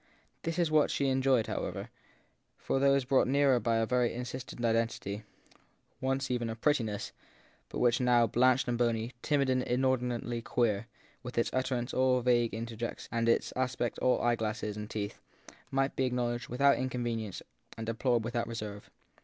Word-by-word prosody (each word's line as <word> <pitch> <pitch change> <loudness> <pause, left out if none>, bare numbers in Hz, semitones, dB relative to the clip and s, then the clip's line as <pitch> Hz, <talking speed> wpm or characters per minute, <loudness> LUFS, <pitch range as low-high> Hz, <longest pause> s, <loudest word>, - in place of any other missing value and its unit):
This 165 0 -3
was 170 -3 +1
what 155 -1 +4
she 140 -1 +1
enjoyed, 130 -3 +3
how - - -3
ever, - - -5 0.7
for 135 - -1
those 140 -1 +3
brought 135 +1 +3
nearer 135 -2 +3
a 115 -1 +2
very 125 0 +1
insistent 125 0 -5
identity, 115 -3 0 0.8
once 135 0 -1
even 120 -2 -1
of 115 0 -6
prettiness, 115 -8 0 0.6
but - - -6
which 120 0 +3
now, 120 -1 +4
blanched 125 +3 +3
and 120 -1 -1
bony, 115 -1 0
timid 145 -2 +1
and 130 -1 +2
inordinately 125 -2 0
queer, 115 -2 0 0.3
with 125 0 -8
its 115 - +1
utterance 130 -1 -1
all 130 0 +3
vague 120 -1 +3
interjec 115 0 -4
tion - - -11
and 115 0 +1
its - - +1
aspect 125 -2 -1
all 125 - +3
eyeglass 110 -2 0
and 105 0 -4
teeth, 105 -2 -4 0.5
might 135 0 0
be 130 -1 +1
acknow 120 -1 0
ledged 120 0 -5
without 140 +3 +3
inconvenience 120 -5 -3 0.3
and 115 - -4
deplored 115 +1 +1
without 120 0 -2
reserve. 105 -3 -6
120 Hz, 165 wpm, -31 LUFS, 115-130 Hz, 0.8 s, what